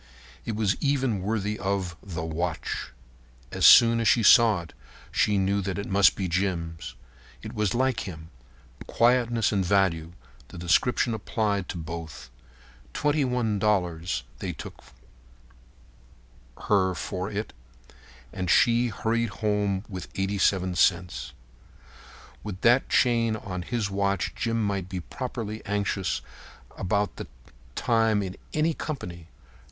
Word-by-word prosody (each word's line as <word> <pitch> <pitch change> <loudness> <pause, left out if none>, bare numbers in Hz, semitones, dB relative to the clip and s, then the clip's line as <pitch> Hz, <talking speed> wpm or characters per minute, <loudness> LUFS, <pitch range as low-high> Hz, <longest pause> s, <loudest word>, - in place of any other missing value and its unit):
It 115 - -3
was 105 -2 +1
even 135 -8 0
worthy 105 +1 -2
of 95 -2 -2
The 85 -5 -6
Watch. 80 -5 -3 0.6
As - - +4
soon 115 0 +8
as 115 - +1
she 115 +2 +4
saw 110 -4 +6
it 85 - -13 0.4
she 105 -1 +2
knew 100 +1 +1
that 95 0 -3
it 100 - -3
must 100 0 +4
be 95 - -2
Jim's. 85 -6 -2 0.5
It - - -7
was 105 0 0
like 130 -3 0
him. 80 -2 -9 0.6
Quietness 120 -2 +2
and 100 -2 +1
value—the 85 -10 -2
description 90 +7 +2
applied 105 -3 -2
to - - -4
both. 80 -6 -7 0.6
Twenty 150 0 +1
one 120 -5 0
dollars 90 - 0 0.2
they - - -4
took - - -10
from - - -21 1.7
her 95 -3 +2
for 95 +2 -4
it, 105 +1 -4 0.8
and 90 -2 -3
she 120 +5 +4
hurried 115 +1 -1
home 105 -2 -1
with 95 -3 -8
the 95 - -1
87 95 -2 +1
cents. 90 -2 +1 1.1
With 100 -2 -6
that 120 +3 +4
chain 115 -3 +2
on 95 -4 -5
his 105 +1 -2
watch 100 -1 -1
Jim 115 -1 -1
might 100 -3 -2
be 95 -1 -4
properly 110 0 -6
anxious 100 -2 -2 0.5
about 100 +2 -1
the - - -6 0.5
time 110 -3 +2
in 95 0 -5 0.2
any 155 +2 +1
company. 90 - -6
100 Hz, 130 wpm, -26 LUFS, 90-115 Hz, 1.7 s, soon